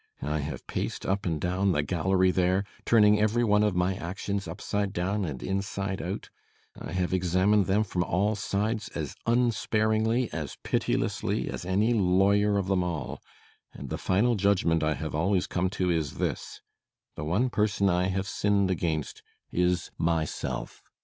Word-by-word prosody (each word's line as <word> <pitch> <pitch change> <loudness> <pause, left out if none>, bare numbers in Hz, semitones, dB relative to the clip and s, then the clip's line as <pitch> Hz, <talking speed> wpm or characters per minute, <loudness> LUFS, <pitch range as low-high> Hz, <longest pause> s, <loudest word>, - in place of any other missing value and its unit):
I 75 +1 -1
have 70 -3 -5
paced - - -4
up 95 0 -1
and 80 -3 -1
down 90 +3 +1
the 75 - +1
gallery 90 +4 +2
there, 90 +2 +2 0.2
turning 105 -2 +5
every 110 +3 +2
one 105 -2 +4
of 105 -3 +2
my 90 +2 +2
actions 100 +1 -4
upside 100 +3 -2
down 95 +3 -1
and 70 -6 -5
inside 100 0 -2
out. - - -5 0.4
I - - -8
have 90 -1 -1
examined 95 +2 +2
them 100 +3 +3
from 90 -3 -1
all 100 +5 +1
sides 105 +2 -2
as 75 -5 -3
unsparingly, 115 0 +1
as 75 -4 -5
pitilessly, - - -1
as - - -6
any 100 +6 +2
lawyer 100 +1 +3
of 100 - 0
them 95 -1 +1
all. 80 -7 -4 0.5
And 70 -2 -8
the - - -3
final 105 +6 +2
judgment 100 -5 +2
I 75 -1 +1
have 75 +2 -5
always 90 +4 +1
come 90 +1 -1
to 90 -1 +1
is 80 -5 -1
this: - - -3 0.5
the 75 - -5
one 105 +12 +1
person 105 -2 +1
I 90 0 +2
have 95 +1 -2
sinned 100 -1 +1
against 80 -4 -2 0.3
is 90 -1 0
myself. 80 -6 -2
95 Hz, 165 wpm, -28 LUFS, 85-105 Hz, 0.5 s, turning